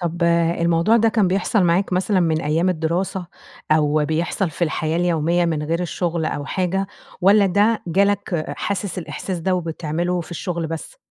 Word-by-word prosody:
طَب 175 0 -3 0.4
الموضوع 170 +6 +3
ده 225 0 +4
كان 215 -4 +2
بيحصَل 195 +2 +1
معاك 180 +3 +1
مثلًا 185 +1 +1
من 160 -2 +1
أيام 160 +5 +1
الدراسة، 180 +2 -1 0.5
أو 150 -1 +2
بيحصَل 165 +4 -1
في 170 +3 -1
الحياة 160 0 -1
اليومية 175 0 +1
من 160 -3 -1
غير 165 +3 -1
الشغل 170 -1 -2
أو 145 -2 -3
حاجة؟ 190 +1 -1 0.3
والّا 200 +2 +5
ده 205 +4 +2
جَه 195 +4 +3
لك 200 -5 -1
حاسس 200 -2 -3
الإحساس 180 +1 -5
ده 185 +3 +1
وبتعمله 170 +1 -2
في 170 - -10
الشغل 170 -1 -3
بس؟ 165 - -7
175 Hz, 165 wpm, -21 LUFS, 160-190 Hz, 0.5 s, والّا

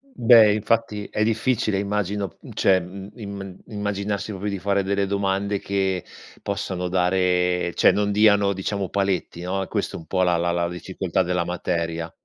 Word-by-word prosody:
Beh 115 -3 +7
infatti 110 -1 0
è 105 - 0
difficile 110 -2 +1
immagino, 100 -2 -2
mhmm, - - -11
cioè, 95 -2 +3
mhmm, 95 +3 -9
im 100 -4 -7
immaginarsi 100 0 -3
proprio 100 +2 -3
di 100 -2 -3
fare 100 +1 +1
delle 100 +1 0
domande 100 0 -1
che 95 -2 -1 0.4
possano 90 -1 -3
dare 90 -1 +1
cioè, - - +5
non 105 0 0
diano, 100 -1 +4
diciamo, 95 0 -3
paletti 95 -3 -1
no, 95 +2 -2
è 95 - -4
questo - - -2
un 80 - -8
po' 95 -1 +1
la 90 -1 +3
la 85 +1 0
la 85 0 0
difficoltà 95 +1 -2
della 90 -1 -1
materia. 85 -2 -2
95 Hz, 165 wpm, -23 LUFS, 90-100 Hz, 0.4 s, Beh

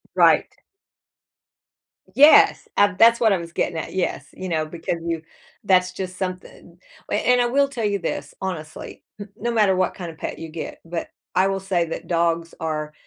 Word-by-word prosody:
Right. - - +4 1.6
Yes. 295 +3 +6
A 205 -2 +4
that's 230 +2 +6
what 220 -3 +4
I - - +2
was 170 -1 -8
getting 170 0 -2
at 160 - -5
yes, 180 -7 -2
you 185 - -7
know, 160 -3 -1
because 165 +2 -4
you 165 -1 -2 0.4
that's 185 -2 +3
just 185 0 -6
something, 185 -2 -7 0.3
a - - +2
and 250 +3 +3
I - - +2
will 280 +4 +2
tell 255 -5 -5
you 205 -1 0
this 145 -4 -4
honestly, 160 -5 -6 0.2
n 205 - -7
no 235 +3 -3
matter 210 -4 +3
what 185 0 0
kinda 175 -4 -7
pet - - -6
you 165 - -6
get 160 0 -7
but 165 0 -5 0.3
I 190 +1 +4
will 195 0 -1
say 190 -2 0
that 165 - -6
dogs 170 -1 0
are 155 -1 -3
185 Hz, 185 wpm, -22 LUFS, 165-200 Hz, 1.6 s, Yes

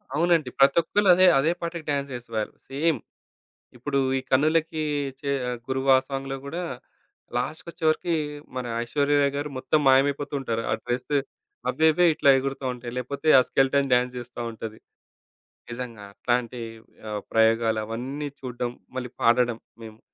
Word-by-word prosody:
అవునండి. 165 -4 +2
ప్రతొక్కళ్ళు 170 +8 +4
అదే, 185 +1 +6
అదే 155 +5 +2
పాటకి 170 -1 -4
డాన్స్ 140 -1 -1
జేసేవాళ్ళు. 115 -3 -4 0.2
సేమ్ 150 +4 +1 0.8
ఇప్పుడు 140 +3 -1 0.2
ఈ - - 0
కన్నులకి 155 +3 +2 0.4
చే 140 - -3 0.4
గురువా 135 0 +3
ఆ - - -11
సాంగ్‌లో 135 0 -3
గూడా 165 +5 -4 0.8
లాస్ట్‌కొచ్చేవరికి 160 +4 -1 0.4
మన 130 -1 -3 0.2
ఐశ్వర్య 145 +4 +1
రాయ్ 140 0 +2
గారు 145 +1 -3
మొత్తం 130 +4 +1
మాయమైపోతూ 140 +2 +3
ఉంటారు. 115 -3 -2
ఆ - - +3
డ్రెస్ 125 +3 -3 0.6
అవ్వే 160 0 +3
అవ్వే 180 +3 +4
ఇట్లా 145 -2 +3
ఎగురుతా 135 0 -3
ఉంటాయి. 120 -1 -8
లేకపోతే 140 +4 -4
ఆ - - +6
స్కెలిటన్ 135 0 +2
డాన్స్ 125 0 +2
జేస్తా 120 0 -8
ఉంటది. 110 -1 -8 0.9
నిజంగా 120 -3 -6
అట్లాంటి 120 +2 -1 0.5
ఆహ్, 105 -1 -3
ప్రయోగాలు 110 0 +3
అవన్నీ 130 +6 -4
చూడడం 125 -2 -4 0.3
మళ్ళీ 125 -2 -4
పాడడం 120 0 +3 0.2
మేము. 110 0 -11
135 Hz, 135 wpm, -25 LUFS, 120-150 Hz, 0.9 s, అదే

